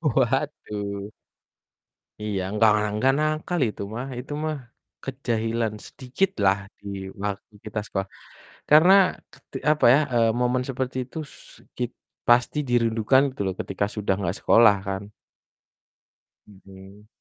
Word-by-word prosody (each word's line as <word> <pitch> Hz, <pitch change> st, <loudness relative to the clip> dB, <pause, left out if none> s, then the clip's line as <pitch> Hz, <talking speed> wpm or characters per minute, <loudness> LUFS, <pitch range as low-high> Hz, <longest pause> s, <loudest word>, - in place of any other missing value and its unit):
Waduh. 105 Hz, -7 st, -1 dB, 1.1 s
Iya, 100 Hz, -3 st, -2 dB
enggak, 105 Hz, +1 st, +4 dB
ah, 105 Hz, 0 st, 0 dB
enggak 130 Hz, +5 st, +3 dB
nakal 155 Hz, +3 st, -1 dB
itu 105 Hz, -, -6 dB
mah 125 Hz, +3 st, -4 dB
itu 135 Hz, +4 st, -9 dB
mah 155 Hz, -1 st, -1 dB, 0.5 s
kejahilan 115 Hz, -4 st, -2 dB
sedikitlah 125 Hz, -, 0 dB, 0.2 s
di 100 Hz, -, -11 dB, 0.4 s
waktu 105 Hz, +1 st, -4 dB
kita 105 Hz, 0 st, -3 dB
sekolah. 95 Hz, -2 st, -3 dB, 0.6 s
Karena 160 Hz, +6 st, +7 dB, 0.4 s
ket -, -, -20 dB, 0.3 s
apa 150 Hz, -, +2 dB
ya, 145 Hz, -, +5 dB
eee, 115 Hz, -1 st, +4 dB
momen 125 Hz, +1 st, +1 dB
seperti 130 Hz, 0 st, -3 dB
itu 130 Hz, -, -11 dB, 0.2 s
su -, -, -16 dB, 0.2 s
kit 125 Hz, -1 st, -2 dB, 0.4 s
pasti 120 Hz, +4 st, +4 dB
dirindukan 115 Hz, +2 st, +3 dB
tuh -, -, -5 dB
loh, 95 Hz, -, -1 dB
ketika 100 Hz, +1 st, -1 dB
sudah 105 Hz, -2 st, 0 dB
engggak 95 Hz, 0 st, -2 dB
sekolah 115 Hz, -3 st, +6 dB
kan? 95 Hz, +1 st, -3 dB, 1.4 s
Mhm. 100 Hz, +1 st, -15 dB
115 Hz, 125 wpm, -24 LUFS, 100-130 Hz, 1.4 s, Karena